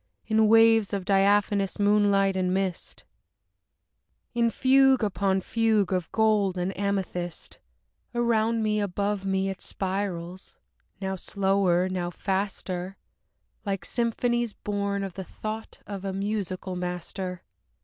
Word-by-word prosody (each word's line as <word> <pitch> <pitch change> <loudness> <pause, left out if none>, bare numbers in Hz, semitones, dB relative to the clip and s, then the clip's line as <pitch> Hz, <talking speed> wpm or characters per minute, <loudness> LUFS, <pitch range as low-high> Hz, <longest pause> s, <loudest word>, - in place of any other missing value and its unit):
In 220 0 +3
waves 225 -1 +5
of 190 -2 -4
diaphanous 200 0 +2
moonlight 205 -1 +3
and 185 -1 0
mist, 190 -2 -3 1.3
In 235 -1 +2
fugue 265 +1 +4
upon 195 -1 +1
fugue 220 -2 +1
of 180 -3 -2
gold 210 -4 +2
and 180 +1 -1
of - - -13
amethyst, 190 -3 -3 0.6
Around 230 -1 +2
me, 210 0 +1
above 200 0 -1
me 190 0 +1
it 195 - -6
spirals; 185 -2 -4 0.4
now 190 -1 -2
slower, 190 -2 +1
now 180 -2 -2
faster, 190 0 -3 0.7
Like 195 -3 -3
symphonies 240 -1 0
born 200 -1 -2
of 195 -2 -5
the 190 - -6
thought 215 +4 -7
of 200 -2 -6
a 195 -1 -3
musical 195 -2 -3
master. 180 +1 -5
195 Hz, 120 wpm, -26 LUFS, 190-215 Hz, 1.3 s, waves